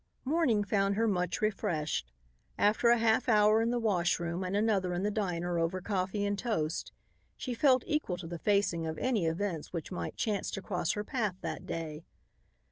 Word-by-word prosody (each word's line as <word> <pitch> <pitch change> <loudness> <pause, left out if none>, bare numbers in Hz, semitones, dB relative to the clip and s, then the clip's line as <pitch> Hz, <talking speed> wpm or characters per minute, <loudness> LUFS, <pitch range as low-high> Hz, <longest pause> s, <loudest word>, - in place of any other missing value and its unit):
Morning 265 -8 +2
found 200 0 +1
her 225 +2 +2
much 180 -4 0
refreshed. 160 - -1 0.5
After 215 +3 +3
a 240 - +6
half 225 +2 +2
hour 215 0 +5
in 230 - +1
the 245 - +1
washroom 175 -5 0
and 185 +2 -2
another 200 -4 +1
in 180 - -2
the 210 - +1
diner, 175 -4 -1
over 165 +3 0
coffee 195 +1 -1
and 205 0 -1
toast, 165 -10 -2 0.5
she 250 - -4
felt 255 +1 +4
equal 300 - -1
to 175 - -8
the 170 0 -6
facing 190 -4 +1
of 160 0 -4
any 225 -10 +1
events 165 -1 -2
which 170 0 -5
might 180 - -4
chance 210 -3 -1
to 195 - -4
cross 180 -4 -1
her 210 - -3
path 215 -6 -1
that 160 -1 -5
day. 160 -1 -5
195 Hz, 185 wpm, -31 LUFS, 170-220 Hz, 0.5 s, a